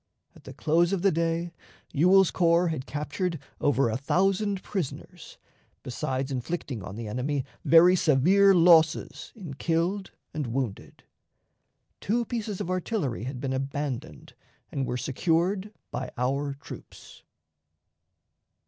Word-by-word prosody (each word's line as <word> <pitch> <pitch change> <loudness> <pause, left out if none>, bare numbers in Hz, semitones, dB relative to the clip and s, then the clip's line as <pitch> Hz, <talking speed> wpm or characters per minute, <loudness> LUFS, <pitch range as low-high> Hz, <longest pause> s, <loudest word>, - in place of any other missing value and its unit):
At - - -18
the - - -9
close 170 +3 +2
of 190 -2 -1
the 195 - +5
day, 165 +1 -1 0.4
Ewell's 180 +5 +5
corps 170 0 +3
had 145 -5 -4
captured 155 +4 -3 0.2
over 140 -3 +2
a 110 - -1
thousand 195 - +1
prisoners, 185 -9 -6 0.5
besides 130 +2 -3
inflicting 130 -2 -4
on 100 +1 -8
the 115 0 -6
enemy 130 +5 -2 0.2
very 175 +2 +7
severe 185 +6 +4
losses 165 -2 +4
in 180 -10 -8
killed 170 +7 -1 0.2
and 150 -4 -3
wounded. 120 -4 -4 1.0
Two 235 +4 0
pieces 215 -4 -4
of 180 - -3
artillery 180 - -2
had 130 -1 -5
been 135 0 -2
abandoned 135 -1 -4 0.4
and 135 -2 -2
were 125 - -2
secured 170 - 0 0.2
by 125 0 -4
our 140 +3 -1
troops. 140 - -12
160 Hz, 125 wpm, -27 LUFS, 135-185 Hz, 1.0 s, very